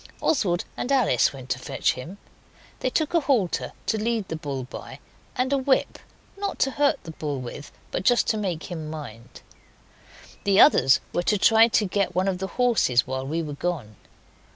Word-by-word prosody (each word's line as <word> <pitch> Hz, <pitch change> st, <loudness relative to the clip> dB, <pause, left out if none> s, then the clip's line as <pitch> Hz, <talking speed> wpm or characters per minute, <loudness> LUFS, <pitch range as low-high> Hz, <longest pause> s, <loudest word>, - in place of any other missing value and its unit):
Oswald 180 Hz, -, +1 dB
and 245 Hz, -, -3 dB
Alice 240 Hz, -, +3 dB
went 130 Hz, -2 st, -9 dB
to 125 Hz, -, -1 dB
fetch -, -, 0 dB
him. 165 Hz, +10 st, -9 dB, 0.6 s
They 255 Hz, -, 0 dB
took 310 Hz, +5 st, -1 dB
a 335 Hz, -, +5 dB
halter 255 Hz, -, 0 dB
to 220 Hz, -, 0 dB
lead 225 Hz, -4 st, -1 dB
the 160 Hz, -, -3 dB
bull 140 Hz, -4 st, -4 dB
by, 125 Hz, -, -9 dB, 0.4 s
and 260 Hz, +2 st, 0 dB
a 275 Hz, -, +2 dB
whip, 265 Hz, 0 st, +1 dB, 0.4 s
not 400 Hz, 0 st, -3 dB
to 270 Hz, -, +2 dB
hurt 285 Hz, 0 st, +1 dB
the 165 Hz, -, -8 dB
bull 150 Hz, -3 st, -4 dB
with, 130 Hz, +3 st, -8 dB, 0.2 s
but -, -, -2 dB
just 240 Hz, +5 st, +3 dB
to 220 Hz, -, +1 dB
make 185 Hz, -5 st, -3 dB
him 160 Hz, -3 st, -5 dB
mind. 120 Hz, -8 st, -9 dB, 1.0 s
The 200 Hz, 0 st, +3 dB
others 135 Hz, -, +6 dB
were 175 Hz, -, +1 dB
to 210 Hz, +4 st, +1 dB
try 225 Hz, +3 st, +6 dB
to 220 Hz, -2 st, +2 dB
get 195 Hz, -1 st, -1 dB
one 185 Hz, +1 st, +1 dB
of 185 Hz, -2 st, -1 dB
the 190 Hz, -, -3 dB
horses 230 Hz, -, +3 dB
while 130 Hz, +1 st, -4 dB
we 165 Hz, +3 st, -2 dB
were 150 Hz, -2 st, -5 dB
gone. 140 Hz, -9 st, -4 dB
185 Hz, 190 wpm, -25 LUFS, 145-240 Hz, 1.0 s, others